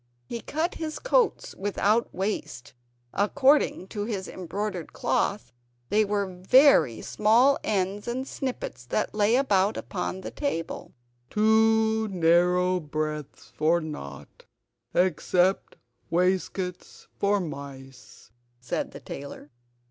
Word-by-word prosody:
He 230 - -6
cut 325 +4 -2
his 310 -1 -5
coats - - +1
without 205 +3 0
waste; 175 - -4 0.4
according 265 +2 +3
to 205 -2 -4
his 200 -4 -4
embroidered 185 0 -5
cloth, 160 - -1 0.4
they 215 +2 +3
were 200 -3 -2
very 250 - +5
small 240 +6 +3
ends 200 +1 -1
and 255 +3 -3
snippets 255 - -5
that 210 - -1
lay 210 +2 +3
about 210 -6 +2
upon 185 0 -4
the - - -6
table 165 - -4 0.3
"Too 220 0 +3
narrow 180 0 +3
breadths 155 -2 -5
for 160 +3 +3
nought 75 - -9 0.5
except 185 +1 +2 0.3
waistcoats 180 +1 -1
for 200 0 +2
mice," 135 - -9 0.3
said 125 -1 -3
the - - -8
tailor. 140 +1 -9
190 Hz, 110 wpm, -26 LUFS, 165-220 Hz, 0.5 s, very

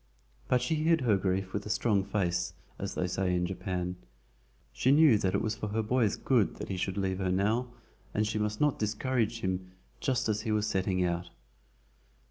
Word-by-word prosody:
But 125 -1 +2
she 125 - 0
hid 160 0 +3
her 115 -5 +3
grief 95 0 -1
with 105 - -2
a - - -6
strong 105 -2 +2
face, 95 -3 -1 0.2
as - - -4
they 90 - 0
say 90 0 0
in 90 0 +1
Japan. 90 -1 -3 0.8
She - - +1
knew 145 -7 +6
that 95 0 0
it - - +1
was 110 - 0
for 105 -1 -4
her 110 +2 -1
boy's 115 -1 +2
good 120 -6 +2
that - - -7
he 95 - -2
should 95 +1 -2
leave 95 -1 -1
her 95 -1 0
now, 105 +7 +1 0.4
and 110 - +1
she 105 0 -1
must 105 0 -1
not 150 -2 +2
discourage 115 +1 0
him 95 0 -3 0.3
just 130 -4 0
as 105 -1 0
he 110 -1 -2
was 105 -1 +1
setting 95 -3 0
out. 85 0 -2
105 Hz, 200 wpm, -30 LUFS, 95-115 Hz, 0.8 s, knew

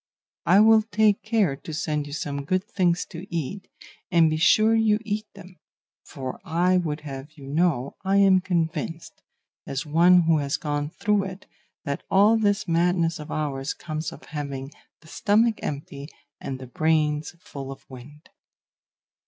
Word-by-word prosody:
I 190 +4 +6
will 220 0 +6
take 215 -1 +2
care 215 -10 +1
to 160 - -9
send 150 -2 -2
you 145 - -8
some 140 -2 -4
good 185 +6 0
things 180 -5 0
to 180 +5 -10
eat; 170 +4 -4 0.4
and 165 -4 +4
be 155 - 0
sure 215 +7 +4
you 220 -2 +3
eat 215 0 -3
them; 180 0 -14 0.4
for 130 -3 -7
I 180 +1 +2
would 155 -4 -2
have 140 +1 -8
you 145 -4 -13
know 145 -2 0
I 195 +1 +2
am 195 -2 +5
convinced, 165 -2 -3 0.5
as 135 +3 -3
one 175 +4 +5
who 165 -2 +3
has 140 +1 -1
gone 145 -1 -2
through 205 +3 0
it, 190 +1 -8 0.4
that 140 0 -3
all 205 +4 +5
this 210 -1 +1
madness 170 0 +1
of 150 - -9
ours 140 -2 -3
comes 155 -1 -5
of - - -12
having 140 -2 -6 0.3
the 160 - -19
stomach 215 +6 +2
empty 140 0 -6 0.3
and 135 - -5
the 130 - -9
brains 155 +3 0
full 135 -6 -8
of 135 - -12
wind. 140 +4 -13
165 Hz, 160 wpm, -25 LUFS, 145-190 Hz, 0.5 s, I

